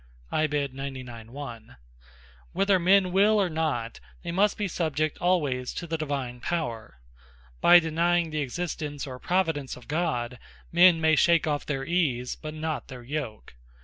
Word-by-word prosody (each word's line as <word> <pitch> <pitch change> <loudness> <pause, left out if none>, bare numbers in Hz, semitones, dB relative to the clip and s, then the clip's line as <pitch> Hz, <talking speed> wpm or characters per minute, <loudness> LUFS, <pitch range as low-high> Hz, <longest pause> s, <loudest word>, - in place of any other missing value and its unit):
(Psal. 155 - +2 0.3
98. 130 -4 -7
1). 120 -3 -9 0.8
Whether 195 -1 +3
men 185 +1 +4
will 205 +3 +4
or 190 -4 +1
not, 145 -8 -2 0.2
they 170 - -4
must 200 +4 +2
be 210 - -1
subject 155 -4 -1
alwayes 145 -9 0
to 175 - -4
the 165 -1 -3
Divine 140 -6 -3
Power. 120 - -3 0.6
By 175 - +9
denying 170 0 +1
the 155 0 -1
Existence, 145 0 -4
or 130 -2 -8
Providence 160 -8 -1
of 125 - -15
God, 135 -7 -2 0.3
men 175 0 +6
may 160 -1 +4
shake 170 +1 +4
off 150 -2 -2
their 135 -2 -2
Ease, 135 -8 0
but 155 0 -8
not 155 -1 -3
their 125 -3 -9
Yoke. 120 - -5
155 Hz, 150 wpm, -27 LUFS, 130-175 Hz, 0.8 s, By